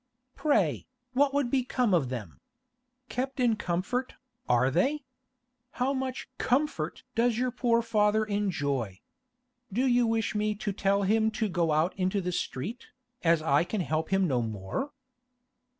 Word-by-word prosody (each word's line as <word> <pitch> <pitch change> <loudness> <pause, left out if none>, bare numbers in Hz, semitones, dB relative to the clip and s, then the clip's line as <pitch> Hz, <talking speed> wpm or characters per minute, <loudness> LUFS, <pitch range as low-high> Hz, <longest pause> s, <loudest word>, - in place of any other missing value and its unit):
Pray, 210 - +1 0.3
what 275 +2 +3
would 280 -4 0
become 250 -4 +1
of 150 -8 +2
them? 110 -10 -6 0.7
Kept 260 +2 -3
in 240 -3 +3
comfort, 210 +7 -2 0.3
are 125 +2 +4
they? 270 - +1 0.7
How 255 +2 0
much 260 -1 -3
comfort 250 - 0
does 235 -1 +2
your 250 +1 0
poor 235 -2 +2
father 215 -1 +2
enjoy? 145 - -1 0.7
Do 245 +7 +1
you 245 -2 +3
wish 225 -1 0
me 210 0 0
to 205 -1 -3
tell 200 +1 +1
him 220 +3 +3
to 220 - +1
go 175 -4 +1
out 155 +4 +2
into 185 +2 +1
the 180 -1 -2
street, 185 - -4 0.4
as 165 -2 +3
I 145 0 +3
can 190 +3 -2
help 160 -1 -1
him 195 -1 +3
no 130 -5 +1
more? 110 - -4
210 Hz, 150 wpm, -29 LUFS, 165-245 Hz, 0.7 s, are